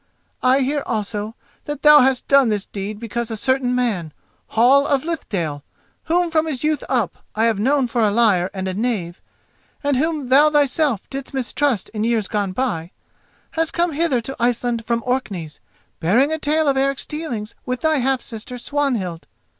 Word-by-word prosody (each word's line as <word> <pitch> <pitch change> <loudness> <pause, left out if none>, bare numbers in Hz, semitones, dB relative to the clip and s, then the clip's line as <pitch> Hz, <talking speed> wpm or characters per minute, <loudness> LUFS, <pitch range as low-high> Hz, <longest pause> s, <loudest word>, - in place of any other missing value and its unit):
I 260 +2 +4
hear 285 +2 0
also 210 0 -3 0.3
that 295 -1 -5
thou 300 0 +9
hast 260 -1 +2
done 275 -3 +5
this 205 -2 -1
deed 205 +1 -6
because 235 +1 -4
a 225 - -4
certain 260 +1 +1
man, 200 -11 -1 0.3
Hall 265 +5 +4
of 280 0 +1
Lithdale—whom 315 - -3
from 320 0 +2
his 285 -4 -3
youth 305 0 0
up - - -1
I 220 - +1
have 225 -3 +2
known 270 +4 +2
for 235 0 -1
a 215 - +4
liar 200 -5 +3
and 190 -1 -4
a 185 - -2
knave, 195 -5 -2 0.6
and 285 -1 +1
whom 300 -2 -1
thou 290 +4 +6
thyself 290 - +1
didst 275 0 -6
mistrust 265 -3 0
in 215 -1 -3
years 225 -3 +1
gone 205 -3 -1
by—has 255 - -5
come 345 0 0
hither 290 -5 +1
to 270 +4 -6
Iceland 240 -1 0
from 235 0 -1
Orkneys, 200 -11 -3 0.4
bearing 240 - +3
a 315 - -2
tale 310 +1 +1
of 275 -1 +2
Eric's 275 0 0
dealings 245 -9 -5
with 250 -1 -2
thy 315 -1 +2
half 260 0 0
sister 235 +2 -6
Swanhild. 240 - -2
250 Hz, 170 wpm, -20 LUFS, 215-285 Hz, 0.6 s, thou